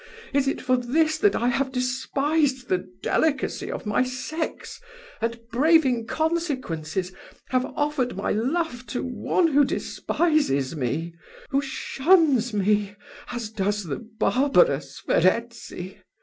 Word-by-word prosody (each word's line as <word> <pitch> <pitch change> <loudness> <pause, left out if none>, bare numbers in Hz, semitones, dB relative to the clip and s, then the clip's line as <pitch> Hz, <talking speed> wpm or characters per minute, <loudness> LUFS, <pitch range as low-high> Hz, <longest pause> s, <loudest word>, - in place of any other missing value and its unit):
is 275 -1 +2
it 275 - 0
for 255 0 +2
this 310 +6 +1
that 410 +2 +3
I 240 - +1
have 265 +2 0
despised 260 +1 0
the 180 -1 -1
delicacy 290 -5 0
of - - -6
my 210 +2 +1
sex, 255 +6 -4 0.4
and, 230 +1 -1
braving 260 -3 +3
consequences, 255 - -2 0.4
have 255 0 +1
offered 290 -4 0
my 195 - -1
love 255 +2 -1
to 245 - -3
one 325 +7 +1
who 290 -1 +5
despises 270 - 0
me 155 +5 -2 0.4
who 275 0 +2
shuns 275 -2 +2
me, 205 0 +1 0.4
as 235 -3 -4
does 205 -1 -1
the 155 -6 -4 0.2
barbarous 280 - +2
Verezzi? 195 -2 0
255 Hz, 120 wpm, -25 LUFS, 210-295 Hz, 0.4 s, who